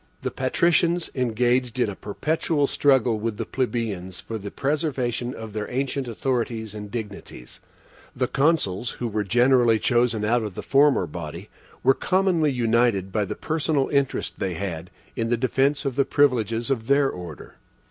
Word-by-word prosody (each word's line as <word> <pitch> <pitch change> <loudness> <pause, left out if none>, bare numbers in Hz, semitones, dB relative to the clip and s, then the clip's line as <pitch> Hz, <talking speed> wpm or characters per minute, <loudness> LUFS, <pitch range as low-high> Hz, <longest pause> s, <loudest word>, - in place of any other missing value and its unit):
The - - -2
patricians 170 +5 +1
engaged 125 0 0
in 120 - +3
a 100 - -5
perpetual 150 - -1
struggle 130 -6 +2
with 110 -1 -3
the - - -3
plebeians 110 -8 -3
for 110 -1 -6
the 100 0 -6
preservation 130 -3 -2
of 110 -2 -8
their 105 -1 -4
ancient 135 +1 -2
authorities 115 -2 -2
and 105 -1 -7
dignities; 105 - -8 0.6
the - - 0
Consuls, 135 - +1
who 120 - -2
were 105 -1 -1
generally 120 +2 +4
chosen 120 -2 +1
out 120 +2 +2
of 105 -4 -5
the - - -6
former 140 -7 +4
body, 85 +4 -7 0.3
were 135 - +6
commonly 180 -3 +1
united 115 -5 +1
by 105 0 0
the - - -5
personal 155 -3 0
interest 140 -2 -1
they 95 -3 -2
had 85 -1 -5 0.3
in 115 0 -1
the 120 - +2
defense 135 +4 +1
of 135 -3 -1
the 140 - +3
privileges 120 -4 +1
of 115 -4 -1
their 140 0 +4
order. 90 - -8
120 Hz, 160 wpm, -24 LUFS, 105-135 Hz, 0.6 s, were